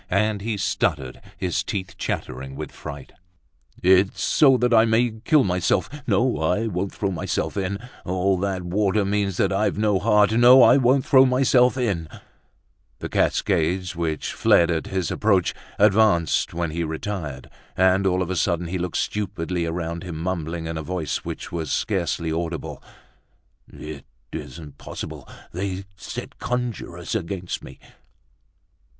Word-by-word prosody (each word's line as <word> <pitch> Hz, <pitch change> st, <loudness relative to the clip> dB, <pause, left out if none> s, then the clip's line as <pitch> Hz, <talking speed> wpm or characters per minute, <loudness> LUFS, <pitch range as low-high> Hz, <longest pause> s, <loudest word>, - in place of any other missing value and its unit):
And 105 Hz, +1 st, +1 dB
he 110 Hz, 0 st, -2 dB
stuttered, 75 Hz, -8 st, -1 dB, 0.2 s
his 90 Hz, -2 st, -1 dB
teeth 95 Hz, -2 st, -4 dB
chattering 65 Hz, +2 st, -4 dB
with 75 Hz, +2 st, -6 dB
fright. 70 Hz, -2 st, -9 dB, 0.7 s
"It's 95 Hz, +2 st, +4 dB
so 135 Hz, -4 st, +5 dB
that 125 Hz, 0 st, +1 dB
I 110 Hz, -1 st, +7 dB
may 115 Hz, +1 st, +2 dB
kill 150 Hz, +2 st, +4 dB
myself. 90 Hz, -1 st, +1 dB, 0.2 s
No, 125 Hz, 0 st, +2 dB
I 90 Hz, +8 st, +1 dB
won't 100 Hz, -2 st, -2 dB
throw 100 Hz, -2 st, -2 dB
myself 90 Hz, -, -2 dB
in! 100 Hz, 0 st, -2 dB, 0.3 s
All 95 Hz, +1 st, +1 dB
that 95 Hz, -1 st, -2 dB
water 100 Hz, +3 st, +1 dB
means 100 Hz, -2 st, -1 dB
that 100 Hz, 0 st, +1 dB
I've 100 Hz, 0 st, 0 dB
no 105 Hz, -2 st, +2 dB
heart. 105 Hz, 0 st, +4 dB
No, 120 Hz, +3 st, +7 dB
I 130 Hz, -, +7 dB
won't 130 Hz, +1 st, +3 dB
throw 130 Hz, -1 st, +6 dB
myself 125 Hz, 0 st, +3 dB
in!" 100 Hz, -11 st, -1 dB, 0.9 s
The -, -, -6 dB
cascades, 90 Hz, +3 st, 0 dB
which 80 Hz, -3 st, -2 dB
fled 85 Hz, 0 st, +4 dB
at 80 Hz, -2 st, -2 dB
his 95 Hz, -2 st, -2 dB
approach, 100 Hz, -5 st, +2 dB, 0.2 s
advanced 100 Hz, -6 st, +3 dB
when 85 Hz, -1 st, -2 dB
he 85 Hz, +2 st, -2 dB
retired. 80 Hz, -4 st, -5 dB, 0.3 s
And 95 Hz, +1 st, +3 dB
all 90 Hz, 0 st, +1 dB
of 90 Hz, -, -5 dB
a -, -, -1 dB
sudden, 85 Hz, -1 st, 0 dB
he 90 Hz, +1 st, -2 dB
looked 90 Hz, -1 st, -2 dB
stupidly 90 Hz, -4 st, -2 dB
around 85 Hz, 0 st, -3 dB
him, 85 Hz, -3 st, -6 dB
mumbling, 85 Hz, -1 st, -3 dB
in 80 Hz, -1 st, -4 dB
a -, -, -3 dB
voice 85 Hz, -1 st, -2 dB
which -, -, -7 dB
was 80 Hz, -4 st, -3 dB
scarcely 85 Hz, -4 st, -1 dB
audible: 85 Hz, -1 st, -4 dB, 0.9 s
"It 75 Hz, -3 st, -9 dB, 0.3 s
isn't 75 Hz, -1 st, -8 dB
possible, -, -, -8 dB, 0.2 s
they 95 Hz, +1 st, -4 dB
set 100 Hz, -, -8 dB
conjurers 120 Hz, -8 st, -4 dB
against 90 Hz, -3 st, -4 dB
me!" -, -, -11 dB
95 Hz, 150 wpm, -23 LUFS, 85-105 Hz, 0.9 s, I